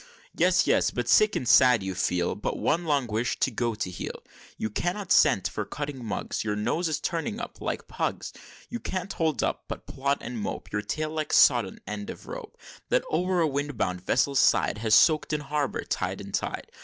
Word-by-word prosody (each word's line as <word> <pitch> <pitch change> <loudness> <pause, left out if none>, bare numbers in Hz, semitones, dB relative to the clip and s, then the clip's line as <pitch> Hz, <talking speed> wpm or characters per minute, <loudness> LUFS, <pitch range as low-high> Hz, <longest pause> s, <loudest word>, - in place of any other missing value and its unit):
"Yes! - - +3
yes! - - +3
but, - - -3
sick 215 0 +5
and 125 - -2
sad, 125 -5 +6
you 95 0 -3
feel 90 -1 0
But 105 - -3
one 170 +3 0
long 145 -4 +1
wish 115 +1 -1
to 135 - +1
go 115 0 -1
to 95 -3 -3
heel; - - -6 0.3
You 110 - -3
cannot 180 - -2
scent 95 - +5
for 105 - -4
cutting 140 +2 -6
mugs 110 - -3
Your 105 -1 -1
nose 125 +11 0
is 155 -1 -1
turning 190 +7 -2
up, 240 - -7
like - - -3
Pug's; - - -3 0.3
You 240 - -5
can't 185 -2 -4
hold 160 -3 0
up, - - -2
but - - -6
plod 140 +1 -1
and 120 -1 -5
mope; 105 - -5
Your 105 - -1
tail 155 +7 -3
like 155 -1 -3
sodden 120 -8 +5
end 105 -1 -5
of - - -8
rope, - - -8 0.3
That - - +2
o'er 180 +2 +1
a 160 - +3
wind 145 -2 -3
bound 90 -4 -1
vessel's 135 +6 +2
side 100 - +3
Has 110 0 +3
soak'd 155 -1 +4
in 150 - 0
harbor, 145 -1 -2
tide - - -2
and - - -9
tide. - - -3
135 Hz, 205 wpm, -27 LUFS, 105-155 Hz, 0.3 s, sad